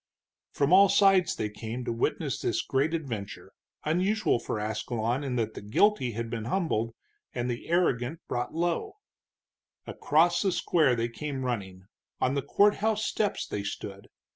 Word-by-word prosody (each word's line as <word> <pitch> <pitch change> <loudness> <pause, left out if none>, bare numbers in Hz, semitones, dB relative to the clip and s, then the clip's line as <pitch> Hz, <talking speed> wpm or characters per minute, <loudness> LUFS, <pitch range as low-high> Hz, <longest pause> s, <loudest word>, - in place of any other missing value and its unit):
From 145 +4 +1
all 195 +1 +8
sides 195 -2 +4
they 110 - -2
came 115 +3 -6
to - - -1
witness 115 - -1
this - - 0
great 145 +5 0
adventure, 115 -11 -6 0.3
unusual 185 - +1
for 110 - -3
Ascalon 110 +4 -2
in 130 -3 -2
that 110 -2 -1
the - - -8
guilty 125 - +2
had 115 +2 -3
been 115 -1 -4
humbled 115 - -1 0.4
and 120 0 -1
the 120 - -6
arrogant 160 -4 +1
brought 120 0 -2
low. 175 - -1 0.9
Across 170 +4 +2
the 195 - +2
square 155 -7 +2
they 115 0 0
came 135 +2 -5
running, 95 -7 -4 0.4
on 130 - +1
the 140 - 0
courthouse 210 +5 +2
steps 210 -2 -1
they 105 - -4
stood. 100 0 -6
130 Hz, 155 wpm, -28 LUFS, 115-175 Hz, 0.9 s, all